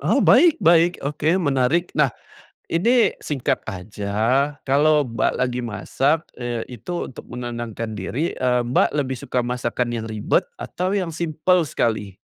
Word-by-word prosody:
Oh, - - +2
baik 340 -3 +6
baik, 170 +1 +5
oke 150 +2 -1
menarik. 145 +1 +1
Nah 150 -3 +3 0.6
ini 230 +8 +3
singkat 140 -5 -1
aja, 100 0 -6 0.5
kalau 150 +2 +3
Mbak 115 -2 0
lagi 125 -1 -1
masak, 135 +7 0 0.2
eee, 120 -2 -3 0.2
itu 175 +10 -4
untuk - - -12
menenangkan 120 -2 -5
diri, 120 - -2
eee, 125 -1 +1
Mbak 120 +2 +2
lebih 130 -3 -1
suka 125 +1 -1
masakan 120 0 -2
yang 115 -1 -3
ribet 110 -1 0
atau 185 +3 -3
yang 180 -4 -1
simpel 165 +1 +1
sekali? 105 -7 -1
130 Hz, 140 wpm, -22 LUFS, 120-160 Hz, 0.6 s, baik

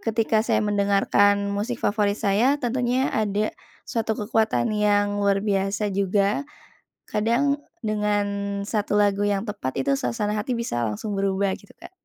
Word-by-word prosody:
ketika 225 -1 +1
saya 215 -1 +1
mendengarkan 200 0 +2
musik 215 +5 -2
favorit 205 -1 +1
saya, 225 +8 +2
tentunya 250 0 0
ada 210 0 0 0.3
suatu 220 -2 -2
kekuatan 220 +1 0
yang 205 -1 +1
luar 200 0 +1
biasa 200 0 0
juga. 200 +7 +1 0.6
Kadang 245 +7 +1 0.2
dengan 210 -1 +1 0.4
satu 205 0 -1
lagu 205 0 +2
yang 200 -1 0
tepat, 205 - -4
itu 140 - +1
suasana 125 - -1
hati 240 +4 -2
bisa 120 - -2
langsung 105 - -4
berubah 195 0 +1
gitu, - - -19
Kak. - - -13
205 Hz, 140 wpm, -24 LUFS, 200-220 Hz, 0.6 s, mendengarkan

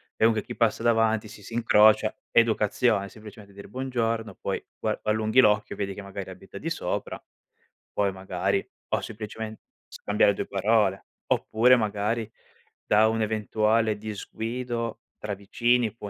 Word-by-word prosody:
e - - +3
dunque 110 -2 +3
chi - - -8
passa 115 0 +1
davanti 110 -2 +2
si 105 - -12
si 115 +3 -9
incrocia 110 -2 +5
educazione, 110 -2 +2
semplicemente 105 -2 -13
dire: 100 +1 -11
"Buongiorno", 115 -3 -2
poi - - -3
pua - - -2
allunghi 110 +3 +2
l'occhio, 105 -3 +3
vedi 100 -1 -3
che 105 - -7
magari 100 0 -7
abita - - -10
di - - -3
sopra, - - -3 0.7
poi 100 -1 +1
magari 95 +1 -2 0.2
o - - 0
semplicemen 110 0 -6 0.3
scambiare 105 0 +2
due - - -4
parole. 100 -1 +1 0.2
Oppure 120 +4 +4
magari, 110 0 -1 0.6
da 110 +1 +4
un 110 0 0
eventuale 110 0 +1
disguido 115 +2 -4 0.2
tra 105 -1 -4
vicini, 115 +3 +1
può 105 -3 -7
110 Hz, 140 wpm, -26 LUFS, 105-115 Hz, 0.7 s, incrocia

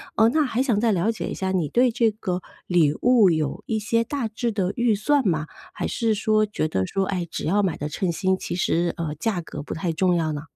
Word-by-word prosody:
呃， 220 - +5
那 310 +5 +2
还 255 -2 0
想 235 -7 +1
再 230 0 +2
了 195 +3 +1
解 220 - -5
一 - - -4
下， 190 -1 -2
你 175 -6 0
对 245 +1 +3
这 230 -1 +2
个 185 -4 -3 0.2
礼 160 -5 +3
物 240 -5 +6
有 155 -4 -1
一 220 - 0
些 230 +2 +1
大 255 0 -3
致 230 +2 -2
的 195 -3 -1
预 235 -3 +2
算 270 +4 +1
吗？ 155 -4 0 0.3
还 - - -3
是 225 -2 0
说 215 +1 +2
觉 205 -6 -2
得 95 -9 -1
说， 195 0 -1
哎， 180 -3 -2
只 - - -5
要 200 +5 +2
买 185 -5 -1
得 145 - -3
称 175 +4 -2
心， 190 +2 +1
其 185 - -5
实， 175 -1 +1
呃， 165 -3 -3
价 210 -2 -1
格 160 -3 -7
不 145 - -6
太 170 +1 -2
重 180 +2 +2
要 160 -2 0
呢？ 145 -1 -4
195 Hz, 265 characters per minute, -24 LUFS, 170-225 Hz, 0.3 s, 物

